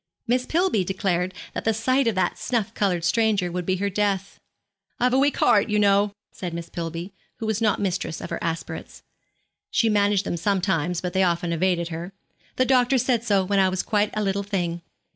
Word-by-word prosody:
Miss 250 Hz, +2 st, 0 dB
Pillby 335 Hz, -, +2 dB
declared 185 Hz, -1 st, -1 dB, 0.2 s
that -, -, -4 dB
the 225 Hz, -1 st, +1 dB
sight 255 Hz, +4 st, +2 dB
of 225 Hz, -, +1 dB
that 185 Hz, -, 0 dB
snuff 230 Hz, -5 st, -1 dB
coloured 180 Hz, -5 st, 0 dB
stranger 205 Hz, -2 st, +2 dB
would 180 Hz, 0 st, -4 dB
be 185 Hz, -, +2 dB
her 200 Hz, +2 st, -1 dB
death. 200 Hz, -1 st, -1 dB, 0.6 s
'I've 250 Hz, +1 st, +2 dB
a 260 Hz, -, +4 dB
weak 280 Hz, +1 st, +2 dB
'art, 205 Hz, +2 st, +4 dB
you 210 Hz, -, +1 dB
know,' 200 Hz, 0 st, +3 dB, 0.2 s
said 175 Hz, -3 st, -6 dB
Miss 170 Hz, 0 st, -7 dB
Pillby, 170 Hz, +3 st, -5 dB, 0.2 s
who 225 Hz, -, -5 dB
was 220 Hz, 0 st, -1 dB
not 215 Hz, -2 st, +2 dB
mistress 185 Hz, -4 st, -2 dB
of -, -, -7 dB
her -, -, -2 dB
aspirates, 165 Hz, 0 st, -5 dB, 0.7 s
she 225 Hz, -, +2 dB
managed 205 Hz, -1 st, +2 dB
them 175 Hz, -, -2 dB
sometimes, 180 Hz, -2 st, 0 dB
but 180 Hz, -1 st, -3 dB
they 190 Hz, -, +2 dB
often 170 Hz, -2 st, +1 dB
evaded 170 Hz, 0 st, 0 dB
her, 170 Hz, +3 st, -6 dB, 0.4 s
'the 255 Hz, -, +2 dB
doctor 255 Hz, 0 st, +3 dB
said 245 Hz, -2 st, +1 dB
so 200 Hz, -4 st, +2 dB
when 200 Hz, +1 st, +1 dB
I 190 Hz, -1 st, +4 dB
was 185 Hz, 0 st, -2 dB
quite 210 Hz, -1 st, +1 dB
a 215 Hz, -, 0 dB
little 195 Hz, 0 st, 0 dB
thing.' 175 Hz, -4 st, -2 dB
195 Hz, 200 wpm, -24 LUFS, 180-220 Hz, 0.7 s, a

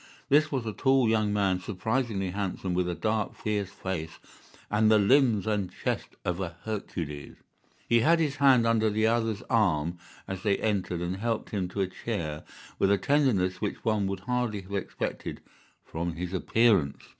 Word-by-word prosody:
This 150 Hz, +2 st, +4 dB
was 130 Hz, -5 st, -1 dB
a 110 Hz, -, -3 dB
tall 135 Hz, +1 st, +3 dB
young 110 Hz, -2 st, +2 dB
man, 100 Hz, -3 st, +1 dB
surprisingly 105 Hz, 0 st, -2 dB
handsome, 95 Hz, -1 st, -3 dB
with 90 Hz, 0 st, 0 dB
a 90 Hz, -, -2 dB
dark, 110 Hz, +4 st, -1 dB
fierce 105 Hz, -3 st, -2 dB
face, 95 Hz, -5 st, -5 dB, 0.5 s
and 105 Hz, +1 st, +4 dB
the 110 Hz, -, +6 dB
limbs 110 Hz, 0 st, +4 dB
and 105 Hz, -4 st, -1 dB
chest -, -, -3 dB
of 90 Hz, 0 st, -1 dB
a 85 Hz, -3 st, -4 dB
Hercules. 85 Hz, -9 st, -5 dB, 0.5 s
He 120 Hz, -, +4 dB
had 165 Hz, +9 st, +4 dB
his 150 Hz, -4 st, 0 dB
hand 130 Hz, -4 st, +5 dB
under 115 Hz, -1 st, +3 dB
the 110 Hz, +1 st, +1 dB
other's 115 Hz, -2 st, +1 dB
arm 85 Hz, -6 st, +1 dB, 0.3 s
as 95 Hz, -1 st, -5 dB
they 100 Hz, -1 st, +2 dB
entered, 95 Hz, -5 st, -1 dB
and 90 Hz, +2 st, -2 dB
helped 115 Hz, +2 st, -2 dB
him 95 Hz, -4 st, -1 dB
to 100 Hz, +2 st, -3 dB
a 95 Hz, -, +1 dB
chair 85 Hz, -7 st, -4 dB, 0.4 s
with 95 Hz, -, +3 dB
a 100 Hz, -, +4 dB
tenderness 100 Hz, -8 st, +1 dB
which -, -, -3 dB
one 110 Hz, -3 st, +1 dB
would 95 Hz, -1 st, -4 dB
hardly 120 Hz, -2 st, -1 dB
have 95 Hz, +1 st, -11 dB
expected 100 Hz, -, -4 dB, 0.5 s
from 85 Hz, +1 st, -3 dB
his 90 Hz, +2 st, -5 dB
appearance. 95 Hz, -6 st, +2 dB
105 Hz, 175 wpm, -28 LUFS, 90-115 Hz, 0.5 s, the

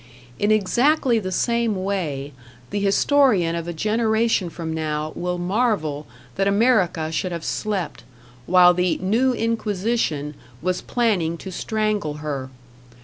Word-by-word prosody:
In 205 Hz, -, +1 dB
exactly 235 Hz, +5 st, +3 dB
the 185 Hz, -3 st, -4 dB
same 235 Hz, +2 st, +1 dB
way, 150 Hz, -8 st, -3 dB, 0.4 s
the 205 Hz, -, -1 dB
historian 200 Hz, -3 st, +3 dB
of 170 Hz, 0 st, -4 dB
a -, -, -2 dB
generation 220 Hz, +1 st, +1 dB
from 160 Hz, -1 st, -5 dB
now 155 Hz, -1 st, -2 dB
will 180 Hz, 0 st, -3 dB
marvel 175 Hz, -, -1 dB, 0.3 s
that 195 Hz, -, +2 dB
America 200 Hz, -7 st, +2 dB
should 165 Hz, +4 st, -2 dB
have 170 Hz, -2 st, -5 dB
slept, 205 Hz, -5 st, -3 dB, 0.4 s
while 180 Hz, 0 st, +6 dB
the 180 Hz, 0 st, +1 dB
New 230 Hz, +8 st, +1 dB
Inquisition 215 Hz, -9 st, -1 dB, 0.3 s
was 180 Hz, +4 st, -1 dB
planning 190 Hz, -9 st, 0 dB
to 190 Hz, -, -8 dB
strangle 215 Hz, -5 st, -1 dB
her. 145 Hz, -3 st, -4 dB
190 Hz, 130 wpm, -22 LUFS, 165-220 Hz, 0.4 s, while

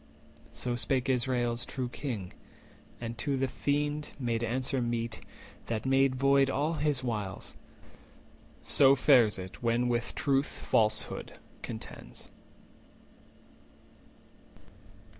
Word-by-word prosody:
440 -, -, -10 dB
So 120 Hz, -1 st, 0 dB
spake 130 Hz, +2 st, +2 dB
Israel's 120 Hz, -2 st, +1 dB
true 130 Hz, 0 st, -3 dB
King, 120 Hz, -8 st, -5 dB, 0.7 s
and 115 Hz, 0 st, -5 dB
to 140 Hz, -2 st, 0 dB
the 135 Hz, 0 st, +1 dB
Fiend 145 Hz, +3 st, -1 dB
Made 120 Hz, -4 st, -1 dB
answer 130 Hz, +3 st, -1 dB
meet, 115 Hz, -1 st, -2 dB, 0.5 s
that 115 Hz, 0 st, -2 dB
made 135 Hz, 0 st, +3 dB
void 135 Hz, +1 st, +4 dB
all 145 Hz, +4 st, 0 dB
his 150 Hz, -4 st, 0 dB
wiles. 105 Hz, -6 st, -4 dB, 1.1 s
So 135 Hz, -1 st, +6 dB
fares 125 Hz, -6 st, +5 dB
it 95 Hz, 0 st, -8 dB
when 120 Hz, +1 st, +1 dB
with 120 Hz, -1 st, -1 dB
truth 140 Hz, 0 st, +2 dB
falsehood 110 Hz, -1 st, 0 dB, 0.3 s
contends. -, -, -8 dB
125 Hz, 105 wpm, -30 LUFS, 115-135 Hz, 1.1 s, So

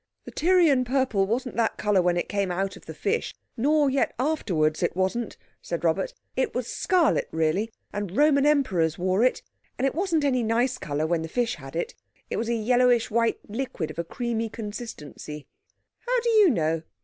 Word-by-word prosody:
"The -, -, -8 dB
Tyrian 330 Hz, -6 st, +4 dB
purple 250 Hz, -6 st, +1 dB
wasn't 250 Hz, +4 st, -2 dB
that 230 Hz, -1 st, +1 dB
colour 210 Hz, -3 st, +2 dB
when 175 Hz, 0 st, +1 dB
it 175 Hz, -, -1 dB
came 200 Hz, -2 st, -1 dB
out 190 Hz, +2 st, -2 dB
of -, -, -15 dB
the -, -, -6 dB
fish, 450 Hz, +3 st, -1 dB, 0.2 s
nor 290 Hz, +4 st, +3 dB
yet 270 Hz, 0 st, +1 dB
afterwards, 185 Hz, -, 0 dB
it 175 Hz, -, 0 dB
wasn't," 190 Hz, +5 st, -1 dB, 0.2 s
said 170 Hz, -1 st, -4 dB
Robert; 170 Hz, +3 st, 0 dB, 0.2 s
"it 260 Hz, -, -1 dB
was 250 Hz, -1 st, -1 dB
scarlet 355 Hz, +6 st, +1 dB
really, 160 Hz, +8 st, 0 dB, 0.2 s
and 205 Hz, -2 st, -4 dB
Roman 290 Hz, -1 st, +4 dB
Emperors 190 Hz, -, +2 dB
wore 185 Hz, +4 st, +1 dB
it. 255 Hz, -, +2 dB, 0.3 s
And 255 Hz, -, 0 dB
it 270 Hz, -, +1 dB
wasn't 335 Hz, -2 st, 0 dB
any 260 Hz, -3 st, +2 dB
nice 235 Hz, +3 st, +1 dB
colour 150 Hz, +1 st, -2 dB
while 165 Hz, 0 st, 0 dB
the 160 Hz, -, -4 dB
fish 235 Hz, +7 st, 0 dB
had -, -, -10 dB
it. -, -, -2 dB, 0.4 s
It -, -, -1 dB
was 230 Hz, +1 st, -2 dB
a 235 Hz, -, +1 dB
yellowish 245 Hz, +1 st, +3 dB
white 230 Hz, +1 st, +1 dB
liquid 210 Hz, -8 st, -4 dB
of 160 Hz, -, -9 dB
a -, -, 0 dB
creamy 230 Hz, +4 st, -3 dB
consistency." 205 Hz, -9 st, -7 dB, 0.6 s
"How -, -, +2 dB
do 475 Hz, -, 0 dB
you 425 Hz, -4 st, +6 dB
know?" 165 Hz, -, 0 dB
230 Hz, 190 wpm, -26 LUFS, 180-270 Hz, 0.6 s, you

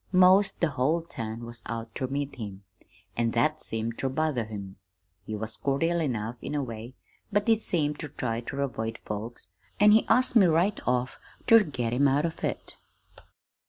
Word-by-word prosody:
'Most 185 Hz, +2 st, +5 dB
the 170 Hz, -, +3 dB
whole 150 Hz, +6 st, +1 dB
town 115 Hz, -6 st, -6 dB
was 120 Hz, 0 st, -7 dB
out 115 Hz, 0 st, -5 dB
ter 130 Hz, -, -2 dB
meet 140 Hz, +1 st, -3 dB
him, 100 Hz, -4 st, -7 dB, 0.5 s
an' 115 Hz, 0 st, +1 dB
that 155 Hz, +5 st, +2 dB
seemed 115 Hz, +1 st, -3 dB
ter 135 Hz, -, 0 dB
bother 135 Hz, -4 st, 0 dB
him. 100 Hz, -3 st, -8 dB, 0.5 s
He 110 Hz, -, -3 dB
was 110 Hz, +1 st, -4 dB
cordial 165 Hz, +5 st, +1 dB
enough, 120 Hz, -5 st, -2 dB
in 150 Hz, -, -4 dB
a 145 Hz, -, 0 dB
way, 115 Hz, +1 st, -7 dB, 0.4 s
but 205 Hz, +2 st, +1 dB
he 225 Hz, -1 st, +4 dB
seemed 150 Hz, -8 st, 0 dB
ter 150 Hz, -, -4 dB
try 115 Hz, -4 st, -3 dB
ter 135 Hz, +4 st, -4 dB
avoid 115 Hz, -4 st, -3 dB
folks, 105 Hz, -2 st, -6 dB, 0.3 s
an' 210 Hz, 0 st, +7 dB
he 220 Hz, +1 st, +5 dB
asked 255 Hz, 0 st, +3 dB
me 200 Hz, -5 st, +7 dB
right 175 Hz, +5 st, +2 dB
off 125 Hz, 0 st, 0 dB, 0.3 s
ter 230 Hz, -2 st, +8 dB
get 125 Hz, -, -3 dB
him 140 Hz, +3 st, +4 dB
'out 140 Hz, +3 st, +2 dB
of 165 Hz, -, -5 dB
it.' -, -, -3 dB
130 Hz, 185 wpm, -28 LUFS, 115-165 Hz, 0.5 s, ter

